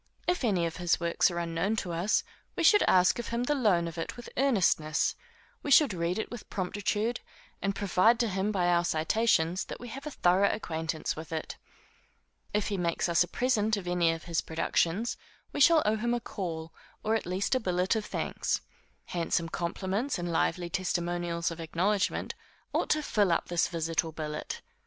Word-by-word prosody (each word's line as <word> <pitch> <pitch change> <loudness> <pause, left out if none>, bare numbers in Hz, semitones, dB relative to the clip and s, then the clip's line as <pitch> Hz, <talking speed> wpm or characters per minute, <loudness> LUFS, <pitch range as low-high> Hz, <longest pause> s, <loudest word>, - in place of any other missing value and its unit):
If 355 -4 0
any 190 -7 +2
of 165 - -4
his 175 -2 +1
works 170 +2 +2
are 175 - -5
unknown 170 +5 -1
to 190 -5 -3
us, 175 +6 +1 0.3
we - - -1
should 415 - +7
ask 180 +2 +4
of 240 - -4
him 235 +1 -1
the 295 - +1
loan 205 -11 +2
of 165 0 -6
it 165 - -5
with 240 - -9
earnestness; 185 - +2 0.5
we - - -5
should 280 -4 +6
read 170 +1 -1
it 220 - -3
with 240 -3 -8
promptitude, 205 +4 -1 0.4
and 195 0 -1
prove 200 +4 +3
to 235 -1 +1
him 195 +1 -1
by 185 -4 +1
our 175 0 +3
citations 175 +1 +1
that - - -7
we 245 - -8
have 275 +5 -7
a - - -2
thorough 190 -6 +3
acquaintance 160 -5 -3
with 160 +1 -8
it. 160 -1 -4 1.0
If 210 0 0
he 200 - -1
makes 170 -1 0
us 170 +1 +4
a - - -7
present 220 -1 +1
of 185 -3 -6
any 175 -2 +2
of 165 -1 -5
his 170 -2 -1
productions, 165 +6 0 0.4
we - - -3
shall 325 +1 +6
owe 215 +1 +2
him 235 +2 0
a - - -1
call, 165 -8 -5 0.3
or 220 - +1
at 225 - -1
least 185 +6 -1
a 260 - +3
billet 180 -2 0
of 220 - -1
thanks. - - -2 0.4
Handsome 170 -1 -1
compliments, 190 +10 -2
and 175 -1 -3
lively 170 +1 0
testimonials 175 -2 -1
of 165 - -7
acknowledgment, 185 +5 0 0.4
ought - - 0
to 305 0 +2
fill 205 -8 +2
up 170 - 0
this 175 -1 +2
visit 165 -1 -1
or 160 - -6
billet. 155 -1 -5
180 Hz, 195 wpm, -29 LUFS, 170-220 Hz, 1.0 s, should